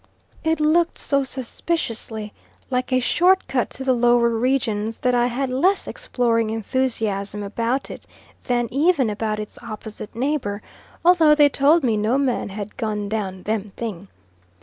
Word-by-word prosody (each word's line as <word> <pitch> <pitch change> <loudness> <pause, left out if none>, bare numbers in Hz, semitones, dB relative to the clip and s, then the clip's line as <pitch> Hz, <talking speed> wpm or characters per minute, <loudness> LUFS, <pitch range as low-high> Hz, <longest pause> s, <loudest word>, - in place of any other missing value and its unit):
It 320 0 +1
looked 330 +3 +2
so 280 -1 +1
suspiciously 230 -5 -4 0.4
like 250 0 -1
a 255 - +4
short 360 +9 +3
cut 255 -3 0
to 265 - -7
the 260 -1 +3
lower 240 -1 +4
regions, 225 -2 0
that 250 -1 +1
I 240 0 +3
had 255 +2 -2
less 360 +10 +2
exploring 235 - 0
enthusiasm 220 -3 -2
about 230 +6 -2
it - - -10 0.4
than 240 -2 +1
even 285 -5 +3
about 215 0 -2
its 210 - -7
opposite 215 0 -8
neighbour; 240 -6 -2 0.4
although 330 -4 +6
they 295 -1 +6
told 285 +4 +3
me 225 -4 +2
no 220 +5 +1
man 265 -6 0
had 205 +1 -7
gone 210 -2 -2
down 195 -4 -3
"them 210 -2 -3
thing." 205 -5 -5
240 Hz, 150 wpm, -22 LUFS, 215-275 Hz, 0.4 s, although